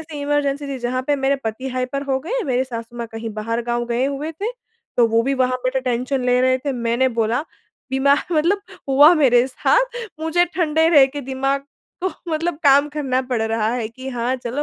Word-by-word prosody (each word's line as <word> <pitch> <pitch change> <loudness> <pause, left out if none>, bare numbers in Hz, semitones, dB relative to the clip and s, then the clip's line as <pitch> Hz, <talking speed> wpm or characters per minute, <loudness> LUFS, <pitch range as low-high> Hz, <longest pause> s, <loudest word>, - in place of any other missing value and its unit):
ऐसी 305 -2 -8
इमरजेंसी 285 0 0
थी 270 -2 -4
जहाँ 250 +1 -2
पे 290 -1 +2
मेरे 275 +1 +1
पति 225 +5 -3
हाइपर 255 +2 -3
हो 265 -1 +1
गए, 475 - -2
मेरे 255 -1 0
सासु 235 -1 -7
माँ 235 -1 -4
कहीं 225 0 -5
बाहर 230 +2 -2
गाँव 240 0 0
गए 240 +2 0
हुए 285 +3 -3
थे। 415 +9 -4 0.4
तो 235 -1 +5
वो 225 +1 +2
भी 275 +2 0
वहाँ 255 -1 +1
बैठे 260 +1 0
टेंशन 255 +1 -1
ले 250 0 +3
रहे 255 0 +3
थे 275 - +1
मैंने 240 +1 +1
बोला 230 +5 +1 0.5
दिमाग 280 +5 +2
मतलब 355 +7 +2 0.3
हुआ 290 +5 +7
मेरे 255 -5 +4
साथ - - +1 0.2
मुझे 330 +2 +2
ठंडे 320 -1 +2
रह 285 -5 +7
के 285 +2 -6
दिमाग 270 +1 -2 0.4
को - - +3 0.2
मतलब 325 0 -1
काम 285 +1 +5
करना 275 -4 -1
पड़ 235 -3 0
रहा 220 -1 0
है 230 -3 -2
कि 260 +3 -9
हाँ 245 0 -1
चलो 255 +3 -3
265 Hz, 205 wpm, -21 LUFS, 245-290 Hz, 0.5 s, हुआ